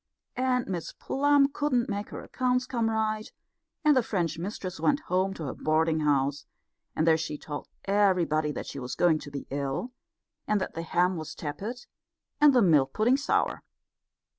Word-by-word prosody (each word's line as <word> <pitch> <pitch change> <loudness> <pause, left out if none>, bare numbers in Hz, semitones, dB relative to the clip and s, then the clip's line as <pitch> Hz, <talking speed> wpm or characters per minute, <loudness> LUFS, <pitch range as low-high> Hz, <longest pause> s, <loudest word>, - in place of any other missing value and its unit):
And 255 -1 +1
Miss 175 -4 -4
Plum 285 0 +3
couldn't 260 -5 +1
make 205 -1 -3
her - - -7
accounts 250 0 0
come 235 -3 0
right; 215 -1 -1 0.5
and 300 -1 +6
the 255 - +5
French 175 -7 -2
mistress 185 0 -5
went 290 +1 +2
home 185 -3 0
to 165 - -6
her 135 - -3
boarding 160 +1 +1
house; 145 -1 +1 0.5
and 155 - +1
there 160 -1 +5
she 155 -2 -4
told 145 -1 -7 0.2
everybody 180 -7 +2
that - - -5
she 140 - -7
was 125 -1 -5
going 165 -3 +3
to 145 - -9
be 140 -1 -6
ill, 140 - -2 0.6
and 210 -1 +2
that 185 - -4
the 165 - -4
ham 175 +2 +1
was 155 -1 -6
tepid 205 +12 -5 0.5
and 295 -1 +7
the 250 -4 +4
milk 145 -7 +4
pudding 230 +4 +3
sour. 280 - 0
185 Hz, 175 wpm, -28 LUFS, 155-245 Hz, 0.6 s, and